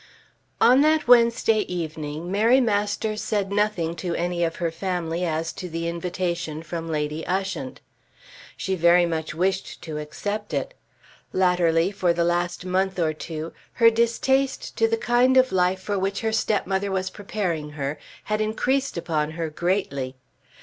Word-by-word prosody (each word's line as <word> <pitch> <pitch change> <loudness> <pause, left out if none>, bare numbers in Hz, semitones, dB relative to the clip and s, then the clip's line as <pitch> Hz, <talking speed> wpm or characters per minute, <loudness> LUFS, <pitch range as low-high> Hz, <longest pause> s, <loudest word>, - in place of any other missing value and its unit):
On 255 +3 +6
that 310 -1 +3
Wednesday 235 -2 +5
evening 160 -1 -4
Mary 225 +6 +4
Masters 210 -2 0
said 200 -2 -1
nothing 200 -5 0
to 175 0 -3
any 175 0 -1
of 165 -1 -1
her 170 -1 -1
family 170 -1 -2
as 165 -1 -1
to 180 - -7
the 165 0 -3
invitation 170 -2 -3
from 165 0 -5
Lady 150 0 -2
Ushant. 190 -8 -3 0.8
She 190 - -2
very 175 0 +5
much 160 -2 -3
wished 190 +3 -1
to 155 -2 -5
accept 205 +8 -4
it. - - -2 0.6
Latterly, 180 -1 +3
for 180 -4 +1
the 170 0 +1
last 175 +1 -1
month 190 +1 0
or 160 -3 +1
two, 160 +1 -6 0.2
her 230 -1 +6
distaste 255 +4 +1
to 450 - +4
the 455 0 0
kind 255 - +3
of 260 0 +5
life 185 0 +1
for 200 0 -2
which 195 +1 -1
her 220 -1 0
stepmother 200 -2 0
was 190 0 -1
preparing 175 -8 -3
her, 140 0 -3 0.2
had 215 0 -1
increased 260 +4 0
upon 155 -3 -1
her 165 -2 -2
greatly. 155 -7 -1
180 Hz, 155 wpm, -24 LUFS, 165-210 Hz, 0.8 s, On